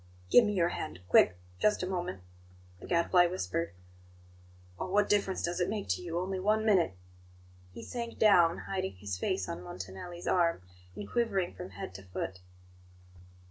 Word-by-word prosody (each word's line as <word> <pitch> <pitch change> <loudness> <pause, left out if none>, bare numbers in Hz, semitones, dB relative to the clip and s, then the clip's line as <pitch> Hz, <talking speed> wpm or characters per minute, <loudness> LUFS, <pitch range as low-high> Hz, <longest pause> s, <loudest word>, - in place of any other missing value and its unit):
"Give 245 - +8
me 210 - 0
your 175 -3 +2
hand 85 - -5
quick 90 +1 +5 0.2
just 210 -3 +2
a - - -1
moment," 180 - -3 0.6
the - - -10
Gadfly 175 +1 +4
whispered. 90 - -3 1.0
"Oh, - - -3
what 205 +2 +3
difference 195 -2 +1
does 175 +1 -1
it 180 +1 +1
make 210 -1 -3
to - - 0
you? 170 -1 -4
Only 185 +1 -2
one 215 +3 +2
minute!" 185 - +3 0.8
He - - -9
sank 235 -1 -5
down, 175 -6 +5
hiding 190 -1 -3
his 95 0 -5
face 95 - -1
on 85 - -5
Montanelli's 95 - -8
arm, 170 - +2 0.3
and 100 - -6
quivering 200 - 0
from - - -8
head 95 0 -7
to 95 - -9
foot. 95 0 -5
175 Hz, 165 wpm, -31 LUFS, -, 1.0 s, Give